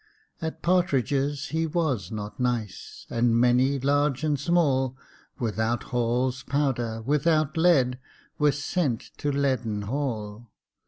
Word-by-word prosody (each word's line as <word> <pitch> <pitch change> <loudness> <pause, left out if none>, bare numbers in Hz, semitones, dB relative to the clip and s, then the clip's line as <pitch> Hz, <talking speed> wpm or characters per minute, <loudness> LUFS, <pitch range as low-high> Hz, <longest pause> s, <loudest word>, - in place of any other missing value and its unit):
At 160 -1 -5
partridges 145 -5 +1
he 160 +2 0
was 150 - -1
not 105 +3 -6
nice; 120 -6 -3
And 115 0 +2
many, 125 +3 +3
large 145 +1 +1
and 150 -3 +1
small, 135 -5 +1 0.4
Without 115 0 -1
Hall's 125 +2 0
powder, 120 -6 -1
without 155 +3 +1
lead, 140 -7 +3 0.4
Were 150 -1 +4
sent 145 -3 -2
to 145 - 0
Leaden 125 -7 0
Hall. 115 -3 -4
130 Hz, 115 wpm, -26 LUFS, 120-145 Hz, 0.4 s, Were